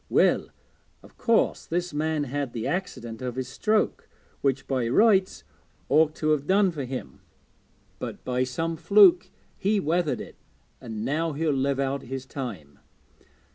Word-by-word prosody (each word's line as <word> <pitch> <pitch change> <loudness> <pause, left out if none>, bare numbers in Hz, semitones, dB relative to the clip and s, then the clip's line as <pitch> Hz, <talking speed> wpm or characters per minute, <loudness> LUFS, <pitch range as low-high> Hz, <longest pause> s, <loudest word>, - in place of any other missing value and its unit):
Well, - - +3 0.6
of - - -17
course 230 -2 +1
this 175 0 -2
man 155 0 0
had 140 -1 -3
the 115 -2 -4
accident 150 -12 -4
of 125 -1 -4
his 130 -1 -3
stroke, 215 +9 0 0.3
which 135 -1 0
by 130 -3 0
rights 195 - +3 0.5
ought 155 0 +4
to 155 - -1
have 150 -1 0
done 195 0 +4
for 145 -5 -5
him, 130 +1 -7 0.8
but - - -7
by 125 0 0
some 165 +6 -2
fluke 195 -1 +5 0.3
he 205 +2 +2
weathered 170 -1 0
it, - - -9 0.4
and 110 -1 -5
now 155 +4 0
he'll 155 +2 0
live 135 0 0
out 140 0 -1
his 130 +1 -6
time. 100 - -7
145 Hz, 150 wpm, -26 LUFS, 130-175 Hz, 0.8 s, fluke